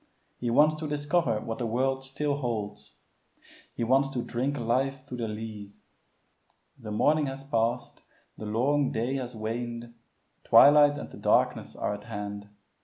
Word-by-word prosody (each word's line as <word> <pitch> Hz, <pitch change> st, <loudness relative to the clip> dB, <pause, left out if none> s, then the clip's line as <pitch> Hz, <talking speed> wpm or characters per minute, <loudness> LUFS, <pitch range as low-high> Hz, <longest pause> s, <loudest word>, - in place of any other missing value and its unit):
He 120 Hz, -, -2 dB
wants 150 Hz, +6 st, +5 dB
to 155 Hz, 0 st, -4 dB
discover 145 Hz, -5 st, 0 dB
what 115 Hz, -1 st, -5 dB
the 120 Hz, -, -1 dB
world 135 Hz, +3 st, 0 dB
still 140 Hz, +2 st, -2 dB
holds. 110 Hz, -6 st, -4 dB, 0.8 s
He -, -, -2 dB
wants 135 Hz, +4 st, +3 dB
to 125 Hz, -3 st, -3 dB
drink 130 Hz, +4 st, -2 dB
life 130 Hz, +3 st, -1 dB
to 130 Hz, -, -7 dB
the 120 Hz, -2 st, -3 dB
lees. 105 Hz, -2 st, -8 dB, 1.0 s
The 115 Hz, -4 st, -8 dB
morning 150 Hz, +8 st, +2 dB
has 135 Hz, 0 st, -6 dB
passed, 120 Hz, -2 st, -1 dB, 0.3 s
the 110 Hz, -, -7 dB
long 135 Hz, +6 st, +1 dB
day 120 Hz, +5 st, -1 dB
has 125 Hz, -2 st, -5 dB
waned, 115 Hz, +2 st, -5 dB, 0.5 s
twilight 145 Hz, 0 st, +7 dB
and -, -, -7 dB
the -, -, -11 dB
darkness -, -, +1 dB
are -, -, -2 dB
at 105 Hz, 0 st, -8 dB
hand. 105 Hz, -2 st, -6 dB
120 Hz, 155 wpm, -28 LUFS, 115-135 Hz, 1.0 s, twilight